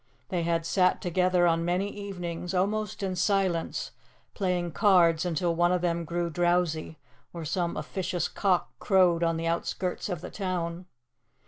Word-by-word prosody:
They 180 -2 -1
had 165 0 0
sat 185 +1 +2
together 180 0 +2
on 165 -1 +2
many 180 +3 0
evenings, 180 -3 -5
almost 205 +2 -1
in 190 -1 -1
silence, 185 -2 0 0.4
playing 180 -3 -1
cards 175 -4 +4
until 170 0 0
one 175 +1 +2
of 180 -1 +1
them 170 -1 0
grew 170 +1 -2
drowsy, 175 -2 0 0.4
or 170 -2 -6
some 170 +2 -1
officious 180 -2 -2
cock 190 -3 0
crowed 180 -4 +3
on 165 -1 +1
the 165 - -3
outskirts 180 +3 -2
of 175 -4 -3
the - - -7
town. 180 -2 -3
175 Hz, 150 wpm, -28 LUFS, 170-185 Hz, 0.4 s, cards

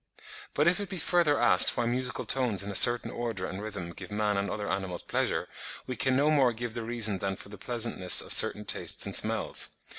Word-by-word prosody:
But 150 +3 +1
if 180 +2 +2
it 205 - -6
be 190 - -6
further 170 -3 +1
asked - - +5
why 120 - -1
musical 125 +2 -4
tones 120 -8 0
in 100 - -6
a - - -7
certain 120 +4 +5
order 115 -6 -5
and 95 +2 -7
rhythm 100 -5 -7
give 85 - -10
man 105 0 -2
and 100 +1 -2
other 105 -1 -5
animals 95 -3 -4
pleasure, - - -2 0.4
we 130 - -6
can 130 +1 0
no 145 +3 +2
more 135 -5 +2
give 120 0 -6
the 115 - -3
reason 110 -4 0
than 95 +1 -3
for 100 - -13
the 105 - -11
pleasantness 115 -6 +2
of - - +1
certain 105 - +2
tastes - - 0
and - - -5
smells. - - +1
115 Hz, 220 wpm, -27 LUFS, 100-130 Hz, 0.4 s, asked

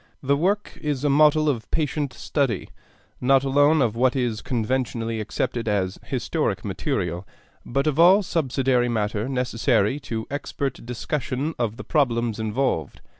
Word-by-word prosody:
The 140 +1 +3
work 185 +3 -1
is 145 -3 -2
a 145 - +3
model 155 +1 +5
of 115 -8 -1
patient 150 -2 -1
study, 135 -9 -1 0.5
not 135 +1 +4
alone 145 +2 +4
of 115 -2 0
what 125 +2 +2
is 120 -5 -1
conventionally 115 -1 -1
accepted 115 +2 -2
as 95 -3 0
historic - - -2
material, 85 +1 -2 0.4
but 135 +3 -1
of 155 0 0
all 185 +5 +7
subsidiary 130 -7 +1
matter 110 +1 -1
necessary 125 -1 +1
to 110 -5 -4
expert 140 -1 -3
discussion 135 +4 -2
of 115 -2 -1
the - - -7
problems 120 -7 +1
involved. 110 - -1
130 Hz, 140 wpm, -24 LUFS, 115-145 Hz, 0.5 s, all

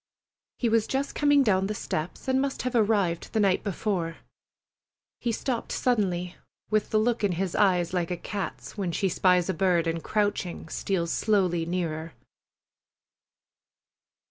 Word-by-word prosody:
He 240 - 0
was 225 -1 +2
just 270 +1 -1
coming 290 -1 +4
down 195 -4 +2
the 210 - -3
steps, 160 +2 -4
and 260 0 +2
must 275 -1 -2
have 255 0 -2
arrived 205 -7 +1
the 220 - +2
night 195 -3 +2
before. 185 -4 -2 1.0
He 240 - -1
stopped 235 +1 -2
suddenly, 185 -7 0 0.3
with 215 0 +1
the 215 - +2
look 225 +1 +1
in 200 -3 +2
his 180 +1 -2
eyes 180 -4 +2
like 175 -2 0
a 180 - -2
cat's 195 -1 -5
when 195 -5 -2
she 195 +3 0
spies 180 0 +3
a 190 - 0
bird 175 -1 +2
and, 165 0 -2
crouching, 205 -6 -1
steals 170 -2 -1
slowly 180 -6 +1
nearer. 165 -2 -3
195 Hz, 150 wpm, -27 LUFS, 175-220 Hz, 1.0 s, coming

